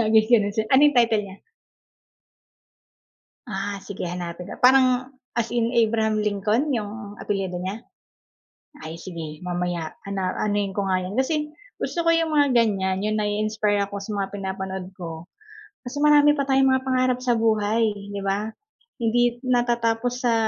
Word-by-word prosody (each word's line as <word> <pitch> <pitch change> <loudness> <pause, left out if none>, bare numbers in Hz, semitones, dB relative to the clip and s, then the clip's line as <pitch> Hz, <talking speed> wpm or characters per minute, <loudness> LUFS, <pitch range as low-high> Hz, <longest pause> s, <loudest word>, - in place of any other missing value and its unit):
Sabi 220 0 +5
ganun, 210 -4 +4 0.2
ano 265 +2 +6
yung 290 -3 +1
title 225 -3 +3
nya? 190 - -11 2.1
Ah, 200 -1 -4
sige 195 -1 -7
hanapin 175 0 -5
ko, - - -9
parang 255 0 +5 0.3
as 230 - 0
in 235 0 +1
Abraham 220 -2 +2
Lincoln 210 +6 0
'yung 210 -1 -5
apelyido 195 -3 -3
niya? 195 +4 -4 1.1
Ay, 165 +1 -7
sige 165 -4 -7
mamaya 175 -2 -3
ana 195 -2 -2
anuhin 205 -2 -1
ko 200 - 0
nga 185 -1 +1
yun, 185 +3 -5
kasi 300 +3 0 0.3
gusto 340 - -1
ko - - +6
yung 330 -1 +1
mga 285 -2 +4
ganyan 195 -5 +2
yung, 215 +1 0
nai-inspire 210 0 0
ako 200 0 -7
sa 205 - -8
mga 200 -1 -1
pinapanood 190 -1 -5
ko. 165 -1 -7 0.6
Kasi 255 +4 -6
marami 295 0 +6
pa 280 - +1
tayong 265 0 +4
mga 260 0 +1
pangarap 255 -1 +2
sa 250 -1 +1
buhay, 220 0 +1 0.3
'di 200 - -4
ba? 200 +2 -1 0.6
Hindi 240 +1 +1
natatapos 240 -1 +1
sa 240 -2 +2
215 Hz, 150 wpm, -24 LUFS, 195-245 Hz, 2.1 s, ano